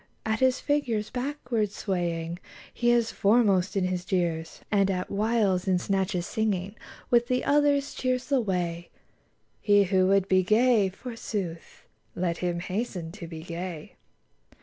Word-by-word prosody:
At 220 0 0
his 260 0 +3
figure's 245 -8 -1
backward 245 -5 -2
swaying 175 -4 -3 0.3
He 240 - +1
is 235 -1 +3
foremost 200 -3 +2
in 190 - +2
his 185 -1 -1
jeers; 170 -3 -2
And 200 -2 +3
at 185 -1 -2
whiles, 205 -3 +1
in 185 -1 +3
snatches 190 -1 -1
singing 200 -4 -1 0.4
With 240 0 +4
the 250 0 0
others, 285 -1 +2
cheers 255 0 -1
the 275 -3 +2
way: 175 -4 -2 0.7
He 205 -1 +5
who 185 -1 +2
would 195 0 +3
be 185 -1 +4
gay, 215 +1 +3
forsooth. 195 -5 -6 0.3
Let 175 -2 -1
him 175 -1 -1
hasten 185 -3 -4
to 175 -2 -9
be 160 -1 -8
gay. 170 -1 -6
195 Hz, 145 wpm, -27 LUFS, 180-235 Hz, 0.7 s, He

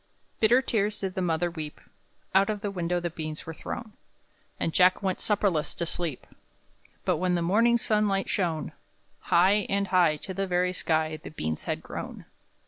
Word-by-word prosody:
Bitter 240 +4 +5
tears 210 -3 0
did 190 -1 -2
the 185 - -2
mother 170 0 0
weep; 155 -3 -6 0.5
Out 195 +2 +4
of 210 -2 -2
the 205 - -2
window 175 -2 -1
the 175 -1 -3
beans 155 -1 -5
were 160 - -6
thrown, 220 +6 -7 0.7
And 165 - -1
Jack 185 +2 +4
went 190 -2 0
supperless 195 -7 +1
to 170 - -1
sleep; 165 -5 -3 0.8
But, 180 -3 +2
when 180 +1 +1
the 170 - 0
morning 230 +7 +4
sunlight 210 -3 +1
shone, 170 -5 -1 0.5
High, 195 +4 +3
and 200 0 0
high, 175 -4 +4
to 190 +5 -7
the 195 +1 -2
very 180 0 +1
sky, 160 -3 0
The - - -7
beans 80 - -4
had - - -2
grown. - - -7
180 Hz, 175 wpm, -27 LUFS, 165-200 Hz, 0.8 s, Bitter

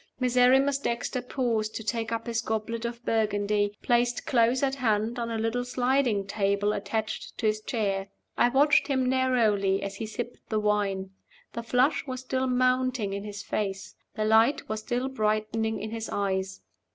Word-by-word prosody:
Miserrimus 255 +2 +4
Dexter 245 0 -2
paused 235 -4 -1
to 225 - -4
take 225 +1 -2
up 230 0 -2
his 230 -1 -1
goblet 225 +1 -3
of 235 0 -5
Burgundy 205 -1 0
placed 240 0 +1
close 245 +1 +2
at 270 -1 +2
hand 230 -2 0
on 235 0 -2
a 225 - -2
little 225 +2 -1
sliding 250 -4 +1
table 200 +1 0
attached 215 +2 -4
to - - -3
his 215 0 +1
chair. 200 -4 -1 0.3
I 240 - +4
watched 290 +4 +4
him 260 -3 +1
narrowly 225 -7 +2
as 200 0 -5
he 220 - -4
sipped 240 +2 -7
the 215 - +1
wine. 200 -2 0 0.4
The 235 - -4
flush 255 +5 +1
was 255 -1 -4
still 260 0 -1
mounting 255 -4 +1
in 200 0 -4
his 205 -1 -7
face; 195 -2 -3 0.2
the 215 -2 -1
light 225 +6 +3
was 215 0 -3
still 245 +3 -2
brightening 220 -2 -1
in 215 +1 -5
his 225 -1 -4
eyes. 190 -1 -2
225 Hz, 170 wpm, -27 LUFS, 210-250 Hz, 0.4 s, Miserrimus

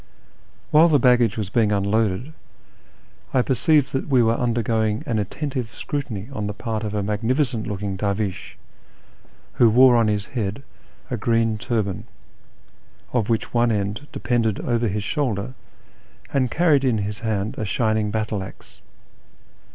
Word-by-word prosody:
"VAHiile 160 +3 +7
the 150 - +5
baggage 125 -3 +3
was 100 -4 -3
being 110 -2 +2
unloaded, 105 +6 0 1.0
I 125 - +4
perceived 140 +2 +2
that 135 - -2
we 130 -4 +4
were 115 0 +3
undergoing 115 -2 0
an 110 -2 -1
attentive 125 +2 -4
scrutiny 115 -9 -4
on 105 -5 -3
the 105 - -4
part 110 -1 -3
of 105 -1 -3
a 105 - 0
magnificent 115 +4 -1
looking 100 -1 -3
dervish, 100 -1 -3 1.0
who 120 - +5
wore 125 +2 +6
on 115 -2 +3
his 105 -1 0
head 110 +2 -3 0.5
a 125 - -1
green 115 0 +1
turban, 110 -5 -2 1.1
of 120 -4 0
which 115 -1 -1
one 120 0 +3
end 105 +6 -2
depended 115 -4 0
over 120 -1 0
his 105 0 -2
shoulder, 125 -3 -2 0.8
and 130 -3 +2
carried 155 -2 +3
in 125 -4 +2
his 105 0 -3
hand 110 -2 -2
a - - -1
shining 110 0 0
battle 105 -1 -2
axe. 95 - -12
110 Hz, 145 wpm, -22 LUFS, 105-125 Hz, 1.1 s, VAHiile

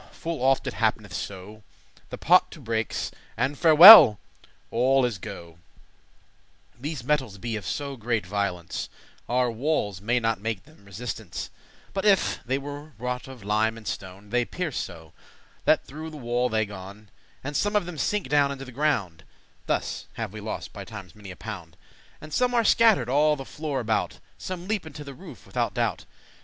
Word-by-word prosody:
full 165 -4 -5
oft 135 +1 +2
it 130 - -3
happ'neth 110 -3 -1
so, 100 +4 -7 0.5
The - - -6
pot 180 +2 +4
to - - -12
breaks, 115 -4 -2 0.3
and 140 +2 0
farewell! 160 - +11 0.5
all 130 +2 +3
is 115 -6 -3
go'.* 85 -1 -8 1.3
*gone - - -22
These 145 -3 -4
metals 130 -7 -1
be 115 +3 -4
of 105 - -6
so 140 -1 -3
great 115 -3 -1
violence, 95 -3 -3 0.4
Our 125 0 +2
walles 115 - -1
may 120 +4 +1
not 115 -3 -1
make 110 -3 -3
them 155 -9 -21
resistence, 105 -1 -6 0.4
*But 195 - -2
if* 205 -2 +3
they 130 +2 -1
were 145 +2 -8
wrought 125 +2 -4
of 130 -5 -11
lime 110 +2 +1
and 110 - -11
stone; 95 -1 -5
*unless* 105 - -19
They 120 0 +2
pierce 180 -3 -4
so, 80 -3 -8 0.5
that - - +3
through 155 +4 -8
the 155 - -10
wall 120 -1 0
they 110 -1 +1
gon; 100 +1 -11 0.3
And 145 +2 -5
some 205 +5 0
of 205 - +2
them 170 -3 -7
sink 205 +8 -1
down 145 -1 +3
into 135 -1 -6
the 130 - -10
ground 115 - -1 0.4
(Thus - - -2
have 110 -3 -5
we 110 - -7
lost 110 - -6
by 100 - -7
times 100 -4 -10
many 105 -2 -12
a 90 - -8
pound), 90 -6 -8 0.4
And 155 0 -11
some 250 0 +1
are 235 - +4
scatter'd 225 -1 +4
all 150 +4 +3
the 135 -2 -8
floor 150 -2 -4
about; 110 -3 -1 0.2
Some 185 -1 -6
leap 210 -6 -2
into 150 -1 -9
the 140 -1 -9
roof - - -13
withoute - - -2
doubt. - - -1
125 Hz, 185 wpm, -26 LUFS, 105-150 Hz, 1.3 s, farewell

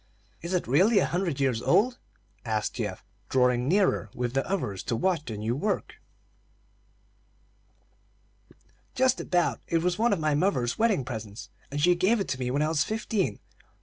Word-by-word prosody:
"Is 170 +2 -2
it 180 - 0
really 190 - +4
a 195 - +4
hundred 175 -5 -2
years 130 -4 +1
old?" 210 - +2 0.4
asked 110 -2 -1
Geoff, 105 -5 -5 0.2
drawing 125 -1 +2
nearer 185 - +2
with 125 -1 -2
the 135 0 +1
others 105 - -2
to 115 - -1
watch 165 +4 0
the 110 -3 -5
new 110 +3 -1
work. 205 +9 -3 2.9
"Just 260 -1 +2
about. 175 -1 0
It 165 -1 0
was 180 +1 0
one 235 +2 +3
of 200 - +1
my 155 -1 +1
mother's 145 - 0
wedding 215 - +2
presents, 110 -4 -7 0.2
and 145 - -4
she 175 +4 +5
gave 195 +6 +2
it 195 - -2
to 130 - -2
me 125 -1 -2
when 140 +4 +1
I 155 - +1
was 155 -2 +2
fifteen. 215 - -2
150 Hz, 170 wpm, -27 LUFS, 125-190 Hz, 2.9 s, she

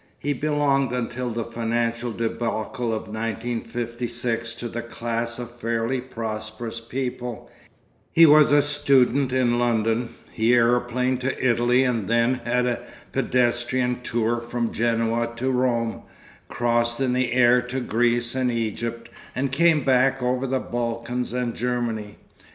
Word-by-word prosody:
He 145 - -1
belonged 140 -2 +1
until 125 0 -2
the 115 0 -2
financial 115 +1 -2
débâcle 115 +1 -2
of 110 - -3
1956 115 +1 -3
to 120 - -5
the 120 +1 -4
class 115 0 -3
of 120 -1 -6
fairly 115 +2 -1
prosperous 110 -1 -5
people, 125 0 -5 0.6
he 165 - +7
was 150 -1 +7
a 145 0 +5
student 140 -2 +3
in 125 -2 +2
London, 115 0 +1 0.2
he 115 +2 +2
aeroplaned 125 +1 +2
to 130 0 -1
Italy 120 +2 +3
and 115 -6 0
then 120 +2 +2
had 125 +1 +1
a 125 -1 0 0.3
pedestrian 125 0 +1
tour 120 -1 0
from 120 0 -3
Genoa 115 0 0
to 130 +3 -1
Rome, 120 -3 0 0.5
crossed 120 0 0
in 130 -2 +1
the 125 -1 0
air 125 0 +5
to 125 +2 -4
Greece 120 0 +1
and 130 -1 0
Egypt, 115 0 -3 0.3
and 130 +1 -1
came 155 0 +4
back 135 0 +3
over 125 +2 0
the 130 0 0
Balkans 120 0 -3
and 125 -1 -2
Germany. 115 -4 -2
120 Hz, 135 wpm, -24 LUFS, 115-125 Hz, 0.6 s, he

